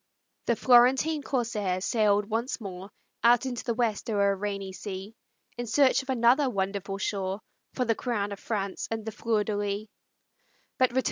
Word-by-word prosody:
The 235 - +3
Florentine 260 +6 +4
corsair 225 -9 -1
sailed 210 0 +2
once 230 +5 -2
more, 190 -2 -7 0.3
Out 240 +2 +5
into 245 -3 -3
the 235 - -1
West 230 -2 -1
o'er 200 -2 +3
a - - 0
rainy 195 -1 -4
sea, 195 +1 -7 0.5
In 240 - -3
search 275 +3 +4
of 265 - -15
another 255 +3 +4
wonderful 195 -2 -2
shore 195 -1 -2 0.4
For 250 - 0
the 225 - +3
crown 210 -4 -2
of 200 - -6
France 200 -4 -3
and 225 -1 -4
the 220 - -3
Fleur 220 0 0
de 210 0 -2
lis. 205 +1 -2
215 Hz, 160 wpm, -28 LUFS, 200-240 Hz, 0.5 s, Out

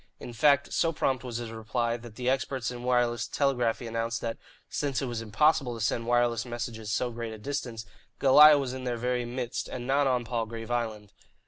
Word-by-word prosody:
In 120 - -8
fact, 140 +4 +3
so 165 - +2
prompt 135 -4 -1
was 120 -2 -4
his 120 -2 -5
reply 115 +1 -1
that 120 -2 -10
the 125 +1 -4
experts 130 -2 0
in 120 -1 -7
wireless 120 -1 +1
telegraphy 125 -4 0
announced 115 0 -2
that, 115 -1 -4 0.3
since 140 -3 -2
it 135 - -2
was 120 -3 -3
impossible 125 +3 +2
to 115 - -1
send 115 0 -1
wireless 120 -1 +2
messages 120 -3 -5
so 125 +2 0
great 115 -1 -5
a - - -8
distance, 120 -2 -4 0.3
Goliah 150 +2 +8
was 130 -2 -3
in 130 0 -6
their 125 -2 -2
very 125 +1 -1
midst 120 0 -4
and 125 -1 -6
not 140 +2 +2
on 125 -2 +1
Palgrave 115 0 -4
Island. 110 -4 -3
120 Hz, 200 wpm, -28 LUFS, 115-130 Hz, 0.3 s, Goliah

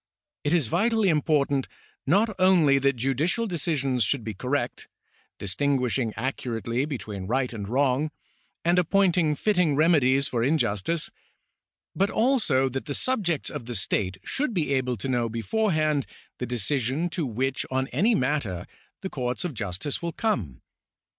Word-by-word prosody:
It 145 - 0
is 165 -5 +3
vitally 220 - +2
important 145 -3 +1 0.4
not 210 +8 +3
only 170 -7 +5
that 140 0 +2
judicial 140 - 0
decisions 145 - 0
should 120 +5 0
be 110 0 -4
correct, 130 +8 -2 0.5
distinguishing 125 +3 0
accurately 120 0 -2
between 105 -10 -5
right 125 +2 0
and 105 -3 -5
wrong, 135 +3 +2 0.6
and 175 +1 +4
appointing 180 -3 +3
fitting 180 -4 +2
remedies 140 -4 +4
for 120 - -1
injustice, 150 - 0 0.8
but 195 +1 +2
also 220 - +2
that 130 +1 -4
the 145 -2 -3
subjects 195 - 0
of 135 -6 -6
the 120 - -4
state 95 -1 0
should 270 -5 -2
be 150 -5 +1
able 130 -2 0
to 105 - -5
know 120 -3 0
beforehand 155 - 0 0.3
the 125 - -3
decision 130 - 0
to 165 0 -2
which 130 +3 -1
on 130 0 0
any 225 +4 +2
matter 125 - -1 0.4
the 190 - -4
courts 125 +3 -3
of 170 - -3
justice 100 +4 -4
will 170 -1 -3
come. 105 - -2
140 Hz, 145 wpm, -26 LUFS, 125-170 Hz, 0.8 s, only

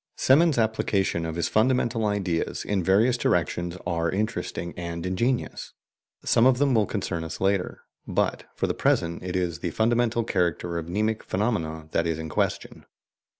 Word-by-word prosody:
Semon's 150 +2 +4
applications 100 -6 0
of 80 - -4
his 85 -1 0
fundamental 115 -1 +2
ideas 95 -5 -1
in 100 -2 0
various 110 +7 +3
directions 85 -6 0
are 85 -1 0
interesting 90 -4 -3
and 85 0 -5
ingenious. 120 +8 -1 0.5
Some 115 +2 +5
of 130 -1 +4
them 140 -1 +2
will 110 -4 +3
concern 95 -5 -3
us 80 - -6
later, 95 -1 0 0.2
but - - -1
for - - 0
the - - 0
present 85 0 0
it 90 0 -4
is 85 -3 -1
the 85 - -2
fundamental 115 +4 +1
character 85 -4 -1
of 80 - -7
mnemic 110 +4 0
phenomena 80 -7 -2
that 85 - +1
is 80 -1 -1
in 80 0 -5
question. - - -2
95 Hz, 160 wpm, -26 LUFS, 85-110 Hz, 0.5 s, Some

